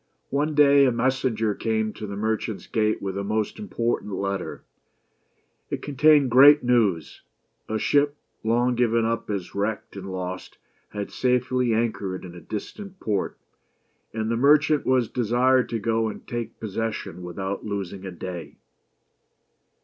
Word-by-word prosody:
One 145 +3 0
day 140 -1 +6
a 130 - +3
messenger 120 -3 0
came 110 0 -1
to 105 - -7
the 100 - -5
merchant's 110 0 -2
gate 110 -2 0
with 95 -1 -3
a - - -2
most 105 - -2
import 120 - -1
ant 105 - -8
letter. 100 0 -3 1.1
It - - -4
contained 145 -1 +4
great 145 +4 +8
news. 110 -9 +1 0.5
A 110 - 0
ship, 145 +6 +2 0.3
long 120 +3 +2
given 115 -1 +2
up 115 -1 -2
as 100 -4 -4
wrecked 105 +1 -3
and 95 -1 -7
lost, 95 0 -6 0.3
had 105 -1 -5
safely 125 -1 +1
anchored 100 -5 -2
in 85 - -9
a 90 - -11
distant 190 - -7
port; 100 -3 -2 0.7
and 110 0 -2
the 115 - 0
merchant 150 +3 +4
was 130 -3 +3
desired 125 +1 +2
to 115 - -1
go 115 +1 0
and 110 - -7
take 120 -2 -5
possession 110 -3 -4
without 95 +3 -4
losing 100 -2 -4
a 95 - -6
day. 85 -4 -7
115 Hz, 150 wpm, -25 LUFS, 100-125 Hz, 1.1 s, great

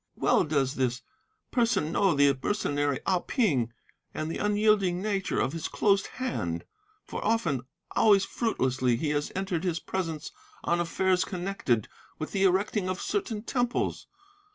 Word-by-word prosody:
Well - - +3
does 140 -3 +1
this 130 -1 0 0.5
person 230 - +2
know 190 -2 +3
the 140 -1 +5
mercenary 145 -9 0
Ah 185 -2 +2
Ping, 145 - +1 0.4
and 155 +1 -2
the - - -4
unyielding 205 -3 +2
nature 195 -1 -1
of 135 - 0
his 165 - -3
closed 200 -2 +2
hand; 90 - -2 0.4
for - - -5
often, 210 -10 +1
but 125 - -10 0.3
always 200 -3 +5
fruitlessly, 130 - 0
he 150 +6 -1
has 145 0 -1
entered 190 -3 -1
his 175 -3 0
presence 165 -4 -4 0.3
on 175 - +1
affairs 185 +2 +2
connected 175 - -1 0.3
with 155 - -5
the 195 -1 +2
erecting 190 +1 +1
of 185 0 -2
certain 235 - -2
temples. 245 -1 -1
180 Hz, 150 wpm, -28 LUFS, 145-205 Hz, 0.5 s, the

